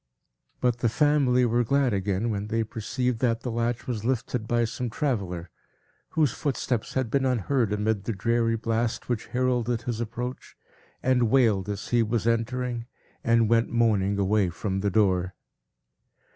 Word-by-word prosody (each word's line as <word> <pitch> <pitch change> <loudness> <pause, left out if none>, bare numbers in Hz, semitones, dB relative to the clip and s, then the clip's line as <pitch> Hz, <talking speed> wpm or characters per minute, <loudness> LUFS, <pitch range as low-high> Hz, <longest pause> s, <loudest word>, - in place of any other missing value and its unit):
But 120 -1 +1
the 120 - +2
family 135 -2 +3
were 120 +1 +2
glad 135 0 +2
again, 100 +3 0
when 105 0 -3
they 115 +1 0
perceived 115 +2 -2
that 115 -2 +1
the 125 - -3
latch 115 +1 -1
was 115 -4 -3
lifted 125 -2 -1
by 120 0 +2
some 120 +2 -4
traveller, 95 - -2 0.7
whose 150 -6 +4
footsteps 125 -5 -2
had 130 -4 0
been 135 +1 +2
unheard 125 -2 +1
amid 105 -1 0
the 115 - -1
dreary 115 +3 +1
blast, 115 +1 -2
which 120 -3 -2
heralded 125 -2 0
his 120 -2 -3
approach, 120 +2 -5 0.5
and 125 -3 +3
wailed 110 -7 +3
as 105 +1 -4
he 120 -1 +3
was 115 0 0
entering, 120 +1 -1 0.4
and 115 -1 +3
went 115 +1 +3
moaning 105 -4 +2
away 100 -1 +2
from 95 +3 -3
the 100 +1 0
door. 95 -3 +1
115 Hz, 160 wpm, -26 LUFS, 105-125 Hz, 0.7 s, whose